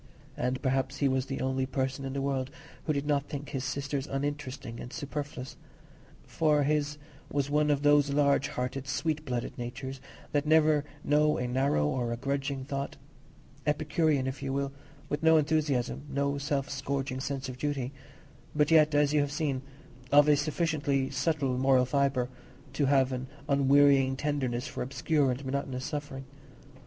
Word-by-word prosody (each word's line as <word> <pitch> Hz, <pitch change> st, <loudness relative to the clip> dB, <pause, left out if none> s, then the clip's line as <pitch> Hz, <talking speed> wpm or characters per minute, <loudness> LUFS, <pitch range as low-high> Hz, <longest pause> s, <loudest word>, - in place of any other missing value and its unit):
And 125 Hz, +1 st, -1 dB
perhaps 135 Hz, 0 st, 0 dB
he 140 Hz, -, +2 dB
was 130 Hz, 0 st, 0 dB
the 135 Hz, -, -3 dB
only 130 Hz, 0 st, 0 dB
person 135 Hz, +1 st, -2 dB
in 135 Hz, -, -4 dB
the 135 Hz, 0 st, -2 dB
world 135 Hz, -2 st, -1 dB, 0.4 s
who 155 Hz, -, +1 dB
did 140 Hz, 0 st, -2 dB
not 145 Hz, -1 st, +1 dB
think 145 Hz, 0 st, -5 dB
his 135 Hz, -3 st, -3 dB
sisters 140 Hz, +1 st, -2 dB
uninteresting 140 Hz, -4 st, -4 dB
and 120 Hz, -, -7 dB
superfluous; 145 Hz, -2 st, -5 dB, 0.7 s
for 150 Hz, -2 st, +2 dB
his 145 Hz, 0 st, 0 dB, 0.3 s
was 140 Hz, 0 st, -1 dB
one 150 Hz, 0 st, +3 dB
of 145 Hz, -1 st, +1 dB
those 145 Hz, -1 st, +5 dB
large 140 Hz, 0 st, +3 dB
hearted, 130 Hz, +1 st, -4 dB
sweet 155 Hz, -1 st, -1 dB
blooded 125 Hz, -3 st, -3 dB
natures 130 Hz, +2 st, -5 dB, 0.3 s
that 145 Hz, +1 st, 0 dB
never 155 Hz, -1 st, +5 dB, 0.2 s
know 150 Hz, +1 st, +3 dB
a 125 Hz, -, -1 dB
narrow 125 Hz, -, +1 dB
or 120 Hz, -, -1 dB
a 120 Hz, -, -2 dB
grudging 135 Hz, +1 st, -2 dB
thought; 140 Hz, 0 st, -4 dB, 0.7 s
Epicurean, 150 Hz, -1 st, +1 dB
if 130 Hz, +1 st, -4 dB
you 135 Hz, -1 st, -2 dB
will, 140 Hz, 0 st, -1 dB, 0.4 s
with 145 Hz, -, -2 dB
no 160 Hz, 0 st, +6 dB
enthusiasm, 145 Hz, -5 st, +1 dB
no 140 Hz, +1 st, 0 dB
self 140 Hz, -1 st, -1 dB
scourging 135 Hz, -1 st, -3 dB
sense 135 Hz, 0 st, -3 dB
of 125 Hz, -1 st, -7 dB
duty; 140 Hz, -3 st, -2 dB, 0.6 s
but 150 Hz, +1 st, +3 dB
yet, 155 Hz, -2 st, +5 dB
as 145 Hz, 0 st, +3 dB
you 150 Hz, -, +4 dB
have 145 Hz, -1 st, -1 dB
seen, 145 Hz, -4 st, -1 dB, 0.5 s
of 145 Hz, +1 st, +7 dB
a 150 Hz, -, +6 dB
sufficiently 145 Hz, -3 st, 0 dB
subtle 135 Hz, -2 st, 0 dB
moral 130 Hz, -1 st, +4 dB
fibre 135 Hz, -1 st, +1 dB, 0.5 s
to 140 Hz, 0 st, +1 dB
have 135 Hz, -1 st, +3 dB
an 130 Hz, 0 st, -3 dB, 0.2 s
unwearying 140 Hz, -1 st, +5 dB
tenderness 135 Hz, -3 st, -1 dB
for -, -, -5 dB
obscure 140 Hz, +2 st, +1 dB
and 130 Hz, +2 st, -3 dB
monotonous 130 Hz, -1 st, -3 dB
suffering. 145 Hz, -2 st, -5 dB
140 Hz, 165 wpm, -29 LUFS, 130-145 Hz, 0.7 s, of